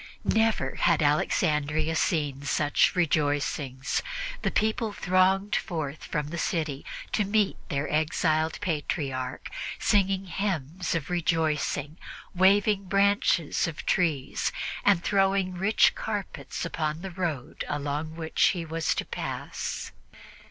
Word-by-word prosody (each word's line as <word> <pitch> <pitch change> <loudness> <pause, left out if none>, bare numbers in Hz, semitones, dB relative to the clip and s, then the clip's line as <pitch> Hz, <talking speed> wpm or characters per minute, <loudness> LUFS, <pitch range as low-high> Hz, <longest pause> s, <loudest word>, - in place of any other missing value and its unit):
Never 220 0 +2
had - - +3
Alexandria 150 +1 +1
seen 145 -5 0
such 145 +3 +2
rejoicings. 145 -5 0 0.4
The - - +1
people 220 0 0
thronged 190 +2 +2
forth 155 -4 -3
from 150 -1 -2
the 170 +1 -4
city 155 -6 -1 0.3
to 210 - +2
meet 205 0 +2
their 140 0 -1
exiled 155 +1 +1
Patriarch, 140 -6 -3 0.3
singing 195 -2 +2
hymns 180 -3 -2
of 165 +1 -3
rejoicing, 160 -3 0 0.3
waving 195 +2 +4
branches 195 -5 +2
of 160 - -6
trees 155 -7 +1 0.3
and 195 -4 +4
throwing 195 -1 +2
rich 195 +5 +4
carpets 205 -4 -4
upon 155 0 -2
the 190 - -5
road 165 -8 -3
along 145 +2 -3
which 160 -1 -1
he 170 -2 -3
was 165 0 -1
to - - -2
pass. - - -4
165 Hz, 115 wpm, -27 LUFS, 150-190 Hz, 0.4 s, waving